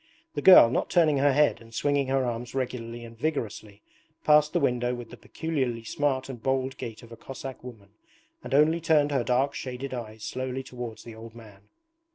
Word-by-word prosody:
The - - -3
girl, 180 -11 +9
not - - -1
turning 160 -5 +3
her 145 +1 +4
head 145 -1 +2
and 115 0 -14
swinging 145 -2 +1
her 135 0 +1
arms 120 +1 -4
regularly 120 -2 -4
and 115 0 -12
vigorously, 110 -7 -4 0.4
passed 150 0 +5
the - - +1
window 125 0 0
with 120 -1 -9
the - - -9
peculiarly 130 -8 -3
smart 135 +2 -1
and 125 -4 -8
bold 130 +1 -1
gait 115 -1 -7
of 120 - -14
a - - -8
Cossack 130 +2 -9
woman 110 -6 -11 0.5
and - - -2
only 160 +3 +4
turned 155 -3 +3
her 135 -4 +1
dark 130 +4 +1
shaded 130 0 -6
eyes 110 -3 -7
slowly 130 0 -4
towards 120 -3 -8
the 115 - -10
old 115 +1 -11
man. 105 -3 -15
125 Hz, 195 wpm, -27 LUFS, 115-140 Hz, 0.5 s, girl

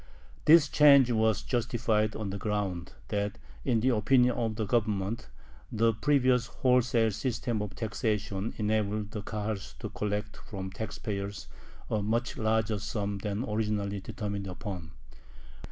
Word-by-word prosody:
This 155 0 +8
change 140 -4 +6
was 110 -2 +2
justified 115 -3 0
on 105 -3 -3
the 100 - -4
ground 95 -4 -2 0.2
that, 100 -1 -1 0.3
in 120 -4 +2
the 130 - +3
opinion 125 +2 +4
of 110 -2 -1
the 110 -1 -2
Government, 105 0 0 0.4
the 115 +1 +3
previous 125 0 +2
wholesale 125 -3 +2
system 115 0 -2
of 105 -1 -5
taxation 105 -2 -2
enabled 105 -1 0
the 105 - -4
Kahals 105 -1 -4
to - - -5
collect 105 +1 -3
from 95 -2 -6
the - - -15
tax 110 -1 -5
payers 100 -1 -4 0.4
a 110 - 0
much 115 +3 -1
larger 110 -1 +1
sum 100 -1 -3
than 105 +3 -2
originally 105 -2 -1
determined 100 0 -4
upon. 90 -3 -6
110 Hz, 140 wpm, -29 LUFS, 100-115 Hz, 0.4 s, This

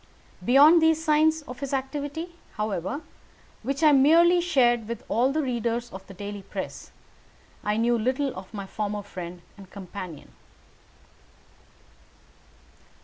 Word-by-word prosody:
Beyond 290 +7 +7
these 320 0 +3
signs 310 0 +3
of 250 -3 -9
his 275 -1 -2
activity, 290 +5 -4 0.2
however, 210 - -3 0.6
which 275 +6 -3
I 305 - +7
merely 335 +6 +5
shared 240 -9 +2
with 235 0 -5
all 245 +4 +2
the 310 +2 0
readers 235 -1 -2
of 190 0 -10
the 195 - -11
daily 205 +1 -6
press, 190 - -7 0.7
I 210 +1 0
knew 235 +1 +2
little 260 +4 -1
of 185 0 -9
my 200 -3 -6
former 205 +1 -4
friend 180 -3 -8
and 195 -2 -13
companion. 185 -5 -9
240 Hz, 130 wpm, -26 LUFS, 205-295 Hz, 0.7 s, Beyond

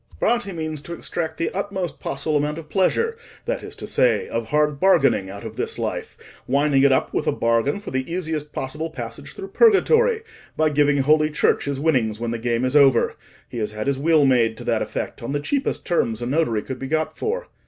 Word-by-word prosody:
"Bratti 235 -4 +1
means 155 -3 -4
to 170 +3 -7
extract 160 -2 -4
the 165 - -1
utmost 190 -3 -4
possible 155 - -2
amount 150 +1 0
of 160 -2 -9
pleasure, 450 - +1 0.3
that - - -2
is - - -8
to - - -6
say, 480 -1 +2
of - - -3
hard 150 -1 +1
bargaining, 140 - +3
out 100 +2 -8
of 110 0 -8
this - - -2
life; - - -4 0.3
winding 140 +1 +3
it 140 0 +5
up 130 - +1
with - - -1
a - - +4
bargain 115 - +1
for 205 - -8
the 130 +4 -3
easiest 160 -4 -3
possible 150 +5 -4
passage 160 - -8
through 390 0 -7
purgatory, 460 +1 +4 0.3
by 155 -1 +2
giving 145 0 +3
Holy 155 +2 +4
Church 150 - +1
his 140 -1 -2
winnings 125 -9 +1
when 115 0 -2
the 115 - -3
game 120 +1 0
is 130 +3 -1
over. 135 -4 +5 0.3
He 120 - -6
has 105 -1 -2
had 110 0 -4
his 140 -1 0
will 155 0 +4
made 115 -4 +3
to - - -8
that - - 0
effect - - -4
on 120 +4 -4
the 145 - 0
cheapest 275 - -2
terms 115 - 0
a - - -2
notary 125 -5 0
could 130 -1 -6
be 135 - -5
got 155 +1 -1
for. - - -3
150 Hz, 215 wpm, -22 LUFS, 130-170 Hz, 0.3 s, it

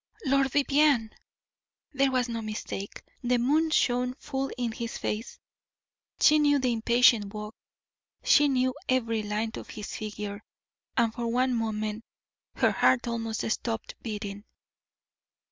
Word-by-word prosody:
Lord 275 0 +3
Vivianne! 280 -4 +3 0.8
there 275 0 +3
was 255 -1 +1
no 230 -1 -3
mistake. 210 -2 -6 0.2
The 245 0 +2
moon 300 +7 +2
shone 250 -4 +1
full 270 0 -3
in 240 -2 -1
his 230 +1 -5
face; 215 +2 -4 0.8
she 305 0 +6
knew 290 -1 +4
the 255 -3 +1
impatient 230 -2 +4
walk; 210 +1 -6 0.7
she 295 -1 +5
knew 255 -2 +1 0.2
every 230 -4 +1
line 210 +2 -2
of - - -9
his 210 -1 -7
figure, 210 -1 -6 0.5
and 230 -2 +3
for 235 -1 -3
one 250 +2 +1
moment 215 -1 -2 0.5
her - - +3
heart 245 -1 +3
almost 225 -1 -2
stopped 225 0 -3
beating. 205 -2 -5
235 Hz, 130 wpm, -28 LUFS, 220-260 Hz, 0.8 s, she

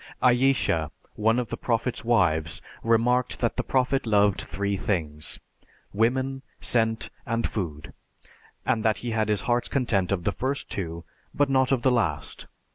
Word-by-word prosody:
Ayesha, 125 - +3 0.3
one 110 +2 +2
of 125 -2 -2
the - - -2
Prophet's 115 +1 -1
wives, 85 -9 +2 0.2
remarked 120 +2 +2
that 120 - 0
the - - 0
Prophet 130 -1 +1
loved 105 -2 +3
three 100 +3 -2
things: 80 -7 -2 0.5
women, 130 +5 +1 0.2
scent 110 -2 0
and 115 0 -1
food, 80 -8 -5 0.7
and 115 -4 +1
that 110 -1 +2
he 120 - -1
had 110 -1 0
his 105 -2 +2
heart's 120 0 0
content 115 -9 +1
of 95 -3 0
the 100 - +1
first 130 +7 -3
two, 85 -3 -4 0.3
but 145 -1 +2
not 130 0 +3
of 130 -3 +1
the 130 - +4
last. 85 - -1
115 Hz, 155 wpm, -26 LUFS, 100-125 Hz, 0.7 s, the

